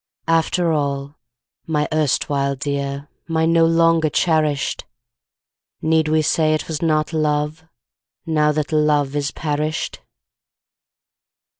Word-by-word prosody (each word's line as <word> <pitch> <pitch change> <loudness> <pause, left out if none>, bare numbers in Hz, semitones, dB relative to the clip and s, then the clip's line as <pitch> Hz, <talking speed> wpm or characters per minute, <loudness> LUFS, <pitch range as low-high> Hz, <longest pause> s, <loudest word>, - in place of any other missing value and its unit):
After 165 +1 +2
all, 140 -1 -2 0.5
my 150 -2 0
erstwhile 140 -2 0
dear, 140 0 -3 0.2
My 160 -1 +1
no 165 0 +4
longer 165 -1 +3
cherished, 155 -4 0 0.9
Need 160 0 +2
we 155 0 +2
say 155 +1 +2
it 155 - -4
was 155 -2 -4
not 155 -1 +1
love, 150 0 -1 0.6
Now 150 -2 +2
that 150 0 -2
love 150 -2 +2
is 145 -1 0
perished? 150 +1 -3
155 Hz, 110 wpm, -20 LUFS, 145-160 Hz, 0.9 s, no